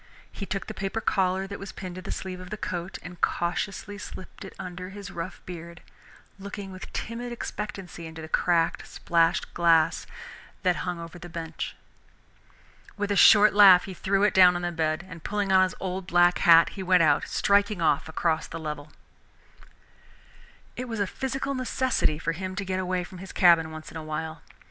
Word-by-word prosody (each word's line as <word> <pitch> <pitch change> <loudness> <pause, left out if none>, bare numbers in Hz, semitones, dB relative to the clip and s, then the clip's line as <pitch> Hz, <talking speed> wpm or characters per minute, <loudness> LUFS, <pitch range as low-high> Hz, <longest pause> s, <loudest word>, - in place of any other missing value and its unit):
He 200 - -7
took 195 0 -3
the - - -6
paper 195 +3 -3
collar 190 -2 +1
that 200 +1 -7
was 195 0 -7
pinned 185 -2 -7
to 185 - -7
the - - -6
sleeve 185 -1 -5
of 185 0 -10
the 210 - -5
coat 185 -3 -4
and 175 -1 -10
cautiously 195 +4 -2
slipped 185 - -9
it 195 - -10
under 180 0 -7
his 200 -1 -9
rough 170 +2 -7
beard, 170 -1 -9 0.6
looking 200 0 -7
with 185 0 -9
timid 240 +2 -5
expectancy 195 -7 -6
into 160 0 -10
the 160 - -7
cracked, 170 +1 +1
splashed 165 -1 +1
glass 165 -2 +3 0.6
that 180 -2 +2
hung 180 -1 -3
over 170 +1 -9
the 175 -1 -9
bench. 165 -1 -5 1.2
With 205 0 -2
a - - +2
short 210 +1 +7
laugh 195 -3 +8
he 190 - -7
threw 195 +2 0
it 210 - +3
down 180 -1 +7
on 175 - -3
the 175 - -1
bed, 160 +1 -1
and 165 -3 -11
pulling 205 -1 -1
on 190 0 +6
his 185 0 +1
old 185 -1 -4
black 175 0 +4
hat, 165 -1 +7
he 195 - -8
went 185 -2 +4
out, 145 -2 +3
striking 200 0 +2
off 155 -1 +1
across 160 0 0
the 165 - -7
level. 150 -2 -6 1.8
It 255 - -5
was 225 -2 -4
a 200 - +2
physical 270 +6 -3
necessity 255 - 0
for 165 +1 -2
him 185 +3 -5
to 200 +1 -3
get 185 0 -2
away 185 -1 -1
from 180 0 -11
his 190 +1 -9
cabin 170 -3 +5
once 155 0 -9
in - - -7
a 160 - -6
while. 155 0 -5
185 Hz, 190 wpm, -26 LUFS, 170-195 Hz, 1.8 s, laugh